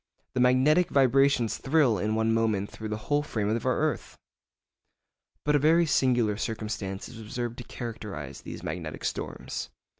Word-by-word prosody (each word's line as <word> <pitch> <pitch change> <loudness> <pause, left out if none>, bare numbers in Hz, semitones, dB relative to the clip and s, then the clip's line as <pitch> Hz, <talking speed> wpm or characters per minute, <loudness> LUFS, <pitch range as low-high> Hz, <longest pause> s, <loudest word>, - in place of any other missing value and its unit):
The 130 - -1
magnetic 130 +8 +4
vibrations 135 -3 +3
thrill 135 - +3
in 110 +3 0
one 110 0 +2
moment 110 -3 0
through 110 -1 -6
the 105 - -2
whole 145 0 +2
frame 110 -8 -2
of 115 +2 -1
our 130 - +2
earth! 155 0 -2 1.3
But 150 0 +3
a - - +5
very 165 +4 +4
singular 120 -8 +2
circumstance 105 -4 -4
is 120 -2 -11
observed 120 +2 -4
to - - -6
characterise 105 - -7
these - - -8
magnetic - - -5
storms. - - -4
120 Hz, 155 wpm, -28 LUFS, 110-140 Hz, 1.3 s, a